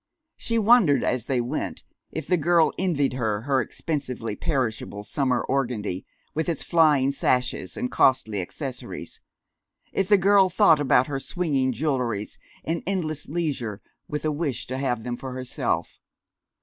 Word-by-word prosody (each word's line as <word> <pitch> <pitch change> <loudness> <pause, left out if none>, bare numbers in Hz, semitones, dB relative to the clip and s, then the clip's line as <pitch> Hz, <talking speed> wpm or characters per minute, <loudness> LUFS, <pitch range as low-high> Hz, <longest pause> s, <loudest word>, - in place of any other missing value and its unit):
She 230 - -1
wondered, 210 - +5
as 125 -2 0
they 130 -3 +1
went, 120 0 -3 0.3
if 160 - -4
the 180 - +2
girl 170 0 +3
envied 155 -8 +1
her 110 -5 -1
her 135 +1 +1
expensively 125 -5 -3
perishable 110 -8 -2
summer 130 +1 0
organdie, 115 -9 -2 0.3
with 160 +2 -1
its 165 - -1
flying 150 -5 +4
sashes 125 -8 0
and 125 - -2
costly 110 -7 +3
accessories; 130 - -6 0.7
if 195 - +1
the 205 0 +6
girl 195 0 +5
thought 175 -4 +5
about 130 -3 +4
her 135 -1 -3
swinging 140 -5 0
jewelries 125 -6 -2 0.3
and 165 +1 -1
endless 160 -6 -2
leisure 140 - -2 0.3
with 150 +1 -4
a 155 - +2
wish 145 -5 -2
to 130 +1 -4
have 125 -4 -1
them 120 0 -3
for 130 0 -6
herself. 130 -1 -3
135 Hz, 150 wpm, -25 LUFS, 125-160 Hz, 0.7 s, the